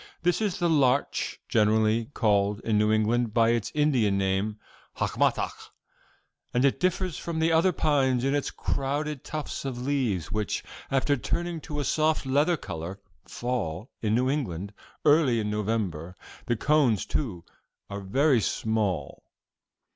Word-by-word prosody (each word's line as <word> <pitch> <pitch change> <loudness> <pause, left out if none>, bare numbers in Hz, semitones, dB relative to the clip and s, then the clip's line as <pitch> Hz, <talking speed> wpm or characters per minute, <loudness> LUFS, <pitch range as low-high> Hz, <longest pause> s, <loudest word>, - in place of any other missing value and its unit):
This 175 +4 +2
is 205 -4 0
the 175 - +1
larch 140 -4 +1
generally 110 +1 +3
called 105 -2 +2
in 110 - 0
New 105 0 +3
England 110 +1 +1
by 115 -1 +4
its 115 -2 0
Indian 130 -10 +2
name 95 +2 0 0.4
of - - -1
hacmatack - - +1 1.0
and 125 +2 +3
it 140 - +2
differs 185 -3 0
from 170 -1 -4
the 160 +1 +2
other 165 +3 +4
pines 135 -6 +1
in 135 +1 +1
its 145 -1 0
crowded 145 +1 -2
tufts 155 -2 -5
of 130 -3 -4
leaves, 125 - -1
which, 105 -1 -2 0.3
after 135 +1 +2
turning 170 +5 -3
to 150 0 -5
a - - 0
soft 155 +1 +1
leather 145 +6 +2
color, 85 - -6 0.3
fall, 120 - -3
in 110 -1 +1
New 125 +2 +2
England, 100 - -2 0.3
early 145 -6 +4
in 105 -1 -2
November. 100 -6 -2 0.3
The 120 - +2
cones, 135 -6 +2
too, 90 - -3 0.4
are 100 0 -6
very 130 +6 +2
small." 100 -11 -1
125 Hz, 145 wpm, -27 LUFS, 105-145 Hz, 1.0 s, by